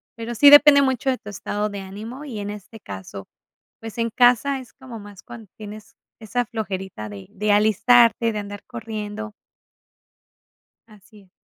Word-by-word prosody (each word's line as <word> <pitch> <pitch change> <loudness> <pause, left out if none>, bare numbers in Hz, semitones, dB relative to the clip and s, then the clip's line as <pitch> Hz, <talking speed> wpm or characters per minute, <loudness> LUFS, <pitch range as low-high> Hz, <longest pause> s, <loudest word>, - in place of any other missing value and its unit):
pero 230 +1 -6
sí 285 +5 +8
depende 290 -1 +8
mucho 265 -1 0
de 255 - 0
tu 210 - -11
estado 205 +1 -3
de 200 -1 -7
ánimo, 215 +8 -9
y 240 -7 -6
en 205 0 -5
este 210 +2 -11
caso, 95 - -9 0.5
pues, 225 0 -9
en 230 0 0
casa 250 +3 +3
es 255 - -13
como 255 -4 -11
más 205 -1 -13
cuando 225 -5 -12
tienes 215 0 -11 0.3
esa 240 +3 -2
flojerita 190 - -6
de 100 -2 -10
de 210 +2 -1
alistarte, 230 +2 +4
de 210 - -3
andar 205 0 -8
corriendo. 220 -2 -6 1.6
Así 215 0 -19
es. 190 - -24
215 Hz, 165 wpm, -22 LUFS, 205-240 Hz, 1.6 s, sí